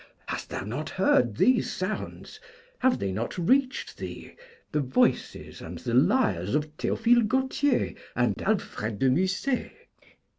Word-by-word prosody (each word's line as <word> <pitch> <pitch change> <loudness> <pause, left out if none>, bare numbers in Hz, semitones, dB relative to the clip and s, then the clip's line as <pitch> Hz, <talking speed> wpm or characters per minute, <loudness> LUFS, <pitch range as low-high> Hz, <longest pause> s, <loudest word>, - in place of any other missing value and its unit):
Hast - - -5
thou - - -4
not 130 +10 -4
heard 125 - +2
these 255 -1 +3
sounds? 190 +3 -5 0.4
have 260 -1 +3
they 95 - -2
not 110 - -3
reached 260 +9 +1
thee, - - -8 0.4
the 150 - +1
voices 130 -1 0
and 85 +2 -7
the 120 +5 -4
lyres 120 - +2
of 150 0 -2
Théophile 235 +5 +2
Gautier 265 +2 +1 0.2
and - - +1
Alfred 115 - -1
de 130 +4 +3
Musset? 190 - 0
170 Hz, 135 wpm, -27 LUFS, -, 0.4 s, these